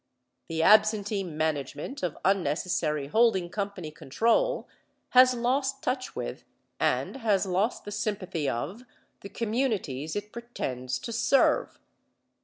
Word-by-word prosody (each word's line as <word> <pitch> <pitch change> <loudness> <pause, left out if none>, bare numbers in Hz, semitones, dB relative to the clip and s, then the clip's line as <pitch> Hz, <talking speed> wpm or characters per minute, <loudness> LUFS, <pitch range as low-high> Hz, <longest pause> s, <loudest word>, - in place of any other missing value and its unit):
The 160 0 0
absentee 210 0 +4
management 155 - -3
of 175 -4 -2
unnecessary 160 -4 +1
holding 190 0 +2
company 200 -6 -4
control 235 - +1 0.4
has 255 0 +6
lost 265 +3 0
touch 255 0 -2
with, - - -5 0.4
and - - 0
has 210 -6 +1
lost 195 +5 0
the 205 - -6
sympathy 195 -8 -2
of, 165 - -4 0.4
the 200 - -9
communities 210 - -2
it 205 0 -4
pretends 130 - -4
to 230 - -6
serve. 245 +4 +2
200 Hz, 115 wpm, -28 LUFS, 160-235 Hz, 0.4 s, has